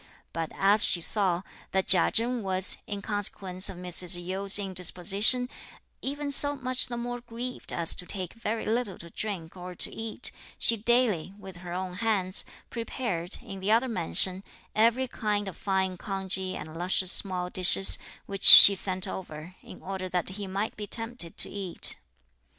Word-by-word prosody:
But 165 Hz, -1 st, -4 dB
as 205 Hz, +2 st, +3 dB
she 175 Hz, -, +2 dB
saw, 185 Hz, 0 st, +2 dB, 0.3 s
that 190 Hz, 0 st, 0 dB
Chia 180 Hz, -3 st, +5 dB
Chen 235 Hz, +2 st, 0 dB
was, 190 Hz, -1 st, 0 dB
in 200 Hz, -1 st, -6 dB
consequence 195 Hz, -2 st, -2 dB
of 190 Hz, -, -9 dB
Mrs. 180 Hz, 0 st, +1 dB
Yu's 195 Hz, +2 st, +1 dB
indisposition, 195 Hz, +5 st, +1 dB, 0.5 s
even 285 Hz, +1 st, -3 dB
so 285 Hz, +1 st, +2 dB
much 255 Hz, -1 st, -1 dB
the 240 Hz, -, -6 dB
more 245 Hz, 0 st, -5 dB
grieved 245 Hz, +1 st, -7 dB
as 170 Hz, -1 st, +4 dB
to 180 Hz, -, -5 dB
take 185 Hz, -4 st, -5 dB
very 230 Hz, -1 st, -4 dB
little 220 Hz, -3 st, -2 dB
to 170 Hz, 0 st, -11 dB
drink 185 Hz, -6 st, -5 dB
or 180 Hz, 0 st, -9 dB
to -, -, +1 dB
eat, 225 Hz, +2 st, -4 dB, 0.3 s
she 230 Hz, -, +5 dB
daily, 220 Hz, -6 st, +1 dB
with 190 Hz, -3 st, -12 dB
her 175 Hz, -1 st, -10 dB
own 185 Hz, 0 st, -5 dB
hands, 200 Hz, -4 st, +1 dB, 0.3 s
prepared, 230 Hz, -7 st, -5 dB
in 195 Hz, -, -9 dB
the 195 Hz, +3 st, -1 dB
other 235 Hz, +4 st, +3 dB
mansion, 185 Hz, -, +1 dB, 0.3 s
every 235 Hz, +4 st, +2 dB
kind 210 Hz, -4 st, -3 dB
of 190 Hz, -, -7 dB
fine 190 Hz, -2 st, -2 dB
congee 190 Hz, -1 st, -4 dB
and 155 Hz, 0 st, -9 dB
luscious 180 Hz, +2 st, +3 dB
small 180 Hz, -2 st, +1 dB
dishes, 95 Hz, -, +5 dB, 0.3 s
which 195 Hz, -1 st, -8 dB
she 200 Hz, -, +11 dB
sent 185 Hz, 0 st, -3 dB
over, 175 Hz, -2 st, -8 dB
in -, -, -14 dB
order 190 Hz, -1 st, -6 dB
that 180 Hz, 0 st, -2 dB
he 200 Hz, +1 st, -7 dB
might 195 Hz, +3 st, -4 dB
be 210 Hz, -1 st, -7 dB
tempted 225 Hz, -6 st, -3 dB
to -, -, +1 dB
eat. 195 Hz, -4 st, -1 dB
195 Hz, 165 wpm, -27 LUFS, 180-225 Hz, 0.5 s, she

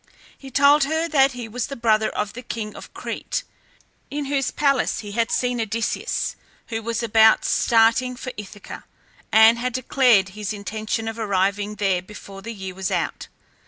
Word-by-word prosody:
He 270 Hz, -, -12 dB
told 280 Hz, +2 st, +5 dB
her 320 Hz, +3 st, 0 dB
that 275 Hz, -3 st, +4 dB
he 245 Hz, -2 st, -6 dB
was 230 Hz, +2 st, -3 dB
the 275 Hz, -, -6 dB
brother 220 Hz, -2 st, +2 dB
of 210 Hz, 0 st, -3 dB
the 250 Hz, -, -7 dB
king 225 Hz, -3 st, -6 dB
of -, -, -11 dB
Crete, -, -, -4 dB, 0.7 s
in 290 Hz, 0 st, -3 dB
whose 275 Hz, -1 st, 0 dB
palace 275 Hz, -3 st, +1 dB
he 205 Hz, -2 st, -8 dB
had 230 Hz, +2 st, 0 dB
seen 245 Hz, -1 st, 0 dB
Odysseus, 225 Hz, +1 st, -2 dB, 0.3 s
who 225 Hz, -1 st, -3 dB
was 230 Hz, +1 st, -2 dB
about 220 Hz, -1 st, +5 dB
starting 230 Hz, +2 st, +3 dB
for 255 Hz, +1 st, -6 dB
Ithaca, 205 Hz, -1 st, -9 dB, 0.5 s
and 225 Hz, +2 st, +6 dB
had 250 Hz, 0 st, -2 dB
declared 245 Hz, -5 st, +3 dB
his 210 Hz, +2 st, -5 dB
intention 215 Hz, +2 st, -4 dB
of 225 Hz, +1 st, -5 dB
arriving 200 Hz, 0 st, 0 dB
there 195 Hz, -3 st, +1 dB
before 195 Hz, 0 st, -11 dB
the 230 Hz, +4 st, -6 dB
year 190 Hz, -4 st, -7 dB
was 190 Hz, 0 st, -3 dB
out. -, -, -2 dB
225 Hz, 170 wpm, -22 LUFS, 210-250 Hz, 0.7 s, and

